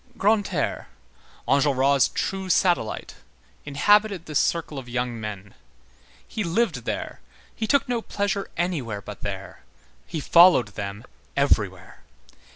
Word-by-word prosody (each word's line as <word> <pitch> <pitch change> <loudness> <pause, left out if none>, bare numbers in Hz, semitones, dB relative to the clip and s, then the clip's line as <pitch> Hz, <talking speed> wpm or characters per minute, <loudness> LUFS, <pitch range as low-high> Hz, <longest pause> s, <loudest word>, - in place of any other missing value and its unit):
Grantaire, 200 -7 0 0.6
Enjolras' 140 -1 +3
true 190 -1 -3
satellite, 175 - +1 0.5
inhabited 195 +6 +3
this 150 -2 0
circle 160 -4 -1
of 125 -2 -11
young 120 -2 -3
men; 100 -2 -7 0.7
he 215 - -3
lived 170 - 0
there, - - -4 0.4
he 220 - -3
took 280 +1 +2
no 240 -2 -1
pleasure 200 -2 -2
anywhere 135 - -2
but - - -9
there; - - -6 0.5
he 165 - -4
followed 170 - +6
them 100 +2 -6 0.3
everywhere. 100 -10 0
145 Hz, 115 wpm, -24 LUFS, 120-195 Hz, 0.7 s, followed